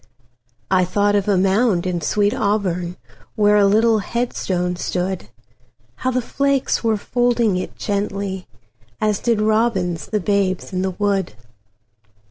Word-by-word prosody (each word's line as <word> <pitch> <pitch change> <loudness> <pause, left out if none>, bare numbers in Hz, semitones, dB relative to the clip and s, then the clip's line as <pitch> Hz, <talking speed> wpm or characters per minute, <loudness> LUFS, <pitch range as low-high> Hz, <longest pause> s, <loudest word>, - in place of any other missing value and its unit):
I 185 -1 +4
thought 205 +3 +1
of 200 -1 +1
a 200 -2 +3
mound 195 0 +2
in 180 -2 -1
sweet 205 +6 +1
AuburnWhere 205 +1 0
a - - +5
little 220 +2 +4
headstone 185 -5 -2
stood; 180 - -3 0.7
How 255 - -1
the 255 -1 0
flakes 275 0 0
were 225 -2 +2
folding 240 -2 +1
it 185 - -5
gently, 200 -2 -3 0.5
As 210 -2 +1
did 230 -3 +1
robins 215 -7 +1
the 215 - -1
babes 195 -1 0
in 185 - -1
the 190 - 0
wood. 195 - -1
200 Hz, 130 wpm, -20 LUFS, 185-220 Hz, 0.7 s, a